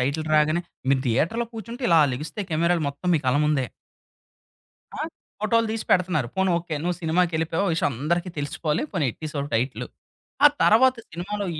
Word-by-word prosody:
Title 140 +5 -1
రాగానే, 155 +3 +3 0.3
మీరు 135 -1 +3
థియేటర్‌లో 165 - +1
కూర్చుంటే 230 +3 -8
ఇలా 165 -2 +6
లెగిస్తే 150 - -5
కెమెరాలు 170 +1 +2
మొత్తం 140 +6 -5
మీ - - +3
కళ్ళ 130 +2 +3
ముందే. 150 -3 +2 1.3
ఆ! - - -3 0.4
ఫోటోలు 230 +2 +2
తీసి 225 - -3
పెడుతన్నారు 175 -9 +2
పోనీ 190 0 +2
ఓకే. 170 -2 -5
నువ్వు 175 +1 -1
సినిమాకెళ్ళిపోయావు 165 +1 +1
విషయం 145 -3 0
అందరికి 170 +4 0
తెలిసిపోవాలి 150 +2 -1
పోనీ 175 -7 0
ఎట్టేశావు 150 -3 -5
టైటిలు. 125 +4 -1 0.6
ఆ - - +13 0.2
తరువాత 255 +4 +5
సినిమాలో 200 +5 -4
165 Hz, 150 wpm, -24 LUFS, 150-190 Hz, 1.3 s, ఆ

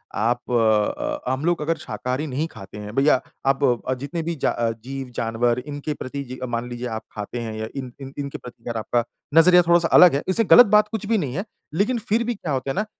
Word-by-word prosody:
आप 120 +3 -1
अ, 110 +2 +1
हम 135 +4 -2
लोग 175 -3 +1
अगर 165 +2 0
शाकाहारी 125 +7 -4
नहीं 145 +5 -2
खाते 95 +1 -11
हैं, 105 +1 -8
भईया 135 -1 +4 0.3
आप 135 +1 +1
अ, 125 0 +1
जितने 140 +6 -4
भी 170 +1 -2
जा - - 0
अ, 115 -1 0
जीव-जानवर 120 -2 -1
इनके 145 +1 -4
प्रति 140 0 -6
जी 130 -1 -8
अ, - - 0
मान 120 0 -3
लीजिए 120 +1 -5
आप 110 - -5
खाते 105 +3 -5
हैं 115 -2 -5
या 110 - -3
इन 130 -3 -5
इन 135 0 -8
इनके 140 0 -4
प्रति 125 -3 -13
अगर 115 - -2
आपका 120 +2 0 0.3
नज़रिया 180 +2 +7
थोड़ा-सा 170 -1 +4
अलग 175 -6 +8
है 140 - -1
इससे 190 +5 +2
गलत 245 - +10
बात 210 0 +5
कुछ 220 -2 -3
भी 225 0 +2
नहीं 140 -7 -2
है, 195 - -2 0.3
लेकिन 210 +9 +1
फिर 225 +3 +2
भी 235 0 -2
क्या 165 -6 -5
होता 135 +1 -2
है - - -5
ना 210 - 0
135 Hz, 235 wpm, -23 LUFS, 120-165 Hz, 0.3 s, गलत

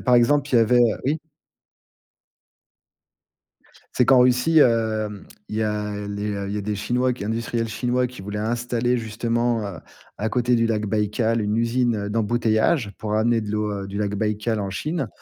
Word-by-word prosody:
par 125 -2 +3
exemple, 140 +4 +3
il - - +2
y - - +7
avait, 115 +2 +4
heu 120 -3 +3
oui? 145 +4 +1 2.8
C'est 125 - +3
qu'en 130 0 +6
Russie, 125 +6 +4
hem, 110 -5 +2 0.2
il 105 - -5
y 110 - +1
a 105 -1 -3
les 100 +1 -4 0.2
il - - -4
y - - -1
a - - -2
des 105 +1 -3
Chinois 125 +5 0
qui 120 -5 -6
industriels 115 +1 -2
Chinois 125 +3 0
qui 125 -5 -11
voulaient 105 +2 -5
installer, 120 +2 0
justement, 115 +1 -1
heu, 95 -4 -7 0.4
à 110 - -1
côté 125 +2 +1
du 115 0 +2
lac 110 -2 -1
Baikal, 110 +2 0
une 105 0 0
usine, 115 0 +1
heu, 100 0 -4
d'embouteillage. 115 +2 +1
Pour 105 -1 -3
amener 115 +2 +2
de 105 -1 -5
l'eau, 105 0 -1
heu, - - -6
du 100 +1 -5
lac 105 -1 -1
Baikal 105 +1 -1
en 100 -1 -3
Chine. 155 - -3
115 Hz, 185 wpm, -23 LUFS, 105-120 Hz, 2.8 s, y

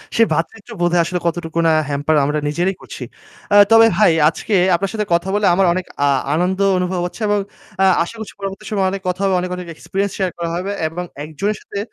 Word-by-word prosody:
সে 230 - +5
ভ্রাতৃত্ববোধে 175 +1 -1
আসলে 180 +1 -2
কতটুকু 170 -1 -2
না - - +4 0.2
হ্যাম্পার 145 +2 0
আমরা 150 +1 0
নিজেরাই 175 +6 0
করছি। - - -8 0.5
আ - - +6 0.2
তবে 225 0 +8
ভাই 210 -4 +5 0.2
আজকে 205 +5 -3 0.2
আপনার 195 +3 -2
সাথে 215 -1 -1
কথা 170 +2 +1
বলে 205 -1 +1
আমার 195 +2 +3
অনেক 185 0 -3 0.2
আ - - +3 0.3
আনন্দ 180 +4 0 0.2
অনুভব 180 0 -1
হচ্ছে 180 +6 -7
এবং 205 0 +2 0.4
আ - - +6 0.2
আশা 175 - -9
করছি 220 - -7
পরবর্তী 195 +1 -6
সময়ে 195 -3 +1
অনেক 195 - -4
কথা 180 +2 -3
হবে, 195 -1 +2
অনেক, 180 0 -3
অনেক 180 -1 -8
experience 195 +4 -3
share 190 -3 -1
করা 170 -1 -3
হবে 185 +3 -3 0.2
এবং 175 +3 -5 0.2
একজনের 160 +8 -3
সাথে 200 - -6
180 Hz, 205 wpm, -18 LUFS, 170-200 Hz, 0.5 s, তবে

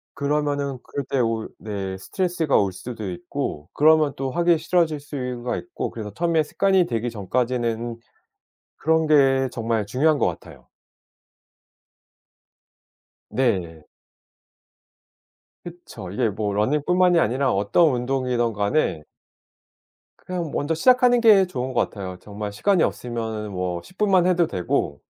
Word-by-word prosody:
그러면은 145 -1 -1
그럴 140 - -5
때 135 - 0
오히 115 -2 0
네 95 -3 -5
스트레스가 170 - 0
올 100 -2 +2
수도 110 +1 -7
있고 75 -3 -5
그러면 155 -1 +4
또 135 0 -3
하기 170 +1 +3
싫어질 160 -3 +1
수가 125 -4 -4
있고 360 - -5
그래서 105 -3 -7
처음에 165 -2 +1
습관이 190 +3 +2
되기 115 0 -2
전까지는 120 +2 -2 0.8
그런 160 +1 +1
게 135 -3 +4
정말 115 -2 -1
중요한 145 +8 +2
것 - - +2
같아요. - - -7 2.6
네. 90 -11 -1 1.8
그쵸. 165 - -10
이게 115 +4 0
뭐 105 0 -3
러닝뿐만이 160 - +2
아니라 130 +1 +1
어떤 105 - +3
운동이든 125 -1 0
간에 105 - 0 1.2
그냥 175 -4 -4
먼저 145 +3 -1
시작하는 250 - +4
게 210 -5 +6
좋은 130 -6 -4
것 120 - +1
같아요. 95 -3 -7
정말 105 0 -6
시간이 190 - +2
없으면은 110 -3 -3
뭐 90 -2 -3
10 185 - -18
분만 190 -4 +3
해도 175 -2 +3
되고 85 - -2
130 Hz, 270 characters per minute, -23 LUFS, 105-160 Hz, 2.6 s, 게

